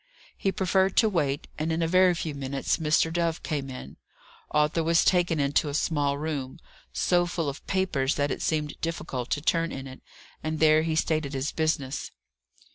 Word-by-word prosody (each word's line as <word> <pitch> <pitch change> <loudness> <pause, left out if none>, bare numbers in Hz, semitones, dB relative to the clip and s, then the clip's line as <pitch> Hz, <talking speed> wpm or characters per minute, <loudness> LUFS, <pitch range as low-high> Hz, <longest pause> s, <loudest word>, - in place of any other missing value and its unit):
He 195 - 0
preferred 190 +1 +1
to 225 - +6
wait: 145 -7 -1
and 160 +2 -1
in 165 +1 0
a - - +1
very 185 +1 +4
few 160 -2 -3
minutes 135 -1 -1
Mr. 160 0 +2
Dove 170 -1 -1
came 140 -4 -3
in. 80 - -9 0.5
Arthur 150 +2 +2
was 165 +1 +3
taken 175 -3 +3
into 145 +2 +1
a 140 - -3
small 145 -3 0
room, 145 -2 -4 0.3
so 175 -1 +2
full 165 -2 -2
of 140 0 -6
papers 175 -8 0
that 145 -1 0
it - - -3
seemed 150 -2 -2
difficult 130 -7 -3
to 145 - -1
turn 165 +1 +1
in 135 0 -6
it, 130 -1 -10 0.4
and 155 0 -3
there 155 0 +5
he 160 0 -1
stated 155 -3 0
his 135 +3 -1
business. 155 -4 -1
155 Hz, 185 wpm, -27 LUFS, 140-165 Hz, 0.5 s, to